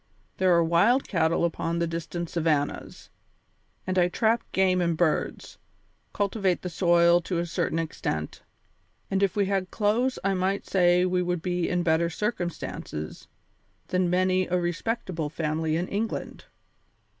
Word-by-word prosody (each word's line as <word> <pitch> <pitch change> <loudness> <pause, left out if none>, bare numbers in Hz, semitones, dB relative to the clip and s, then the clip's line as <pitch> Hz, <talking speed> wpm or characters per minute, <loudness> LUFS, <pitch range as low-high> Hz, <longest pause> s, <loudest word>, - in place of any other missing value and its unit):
There 185 -1 +3
are 170 - +4
wild 200 +11 +3
cattle 165 -2 +1
upon 170 0 -2
the 170 - +1
distant 170 +1 -4
savannas, 155 -4 -2 0.7
and 185 0 0
I 175 - +4
trap 225 +5 +1
game 185 -1 +2
and 170 -2 0
birds, 155 -2 -1 0.5
cultivate 200 -3 0
the 180 - -4
soil 170 0 +4
to 175 0 -3
a 170 - 0
certain 165 -1 -1
extent, 80 - -3 0.7
and 190 0 +1
if 195 -3 +1
we 205 -1 +2
had 190 -1 -1
clothes 230 +6 +1
I 195 0 +1
might 190 +2 -1
say 180 -1 +3
we 180 0 +1
would 180 -2 -2
be 180 -1 -1
in 180 -1 0
better 170 0 +2
circumstances 175 - -4 0.6
than 185 -1 +1
many 185 +1 +2
a 180 0 +1
respectable 175 -2 -2
family 155 0 -1
in 175 +2 -1
England. 220 +2 -4
175 Hz, 145 wpm, -26 LUFS, 170-190 Hz, 0.7 s, are